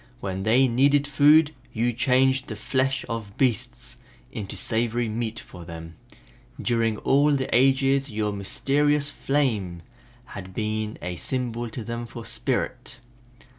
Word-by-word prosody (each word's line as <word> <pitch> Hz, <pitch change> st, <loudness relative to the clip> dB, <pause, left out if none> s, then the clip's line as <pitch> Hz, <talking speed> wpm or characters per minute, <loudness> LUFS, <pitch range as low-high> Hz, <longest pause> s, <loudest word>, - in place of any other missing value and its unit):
When 95 Hz, -2 st, -4 dB
they 120 Hz, +6 st, +4 dB
needed 140 Hz, +4 st, +3 dB
food 150 Hz, +2 st, +5 dB, 0.2 s
you 120 Hz, +2 st, +1 dB
changed 130 Hz, +2 st, +2 dB
the 110 Hz, -, -5 dB
flesh 130 Hz, +5 st, -1 dB
of 110 Hz, -3 st, -5 dB
beasts 125 Hz, -6 st, -1 dB, 0.3 s
into 100 Hz, -3 st, -6 dB
savory 120 Hz, +1 st, 0 dB
meat 110 Hz, +1 st, -3 dB
for 90 Hz, -, -11 dB
them. 80 Hz, -1 st, -9 dB, 0.7 s
During 115 Hz, -2 st, +1 dB
all 145 Hz, +5 st, +3 dB
the 135 Hz, -2 st, 0 dB
ages 135 Hz, +1 st, +3 dB
your 105 Hz, -1 st, -1 dB
mysterious 145 Hz, +8 st, 0 dB
flame 110 Hz, -, -1 dB, 0.4 s
has 100 Hz, -6 st, -8 dB
been 110 Hz, +2 st, -3 dB
a 90 Hz, 0 st, -4 dB
symbol 120 Hz, -1 st, -2 dB
to 115 Hz, +1 st, -6 dB
them 120 Hz, +2 st, -5 dB
for 115 Hz, +1 st, -9 dB
Spirit. -, -, -3 dB
120 Hz, 130 wpm, -25 LUFS, 110-135 Hz, 0.7 s, food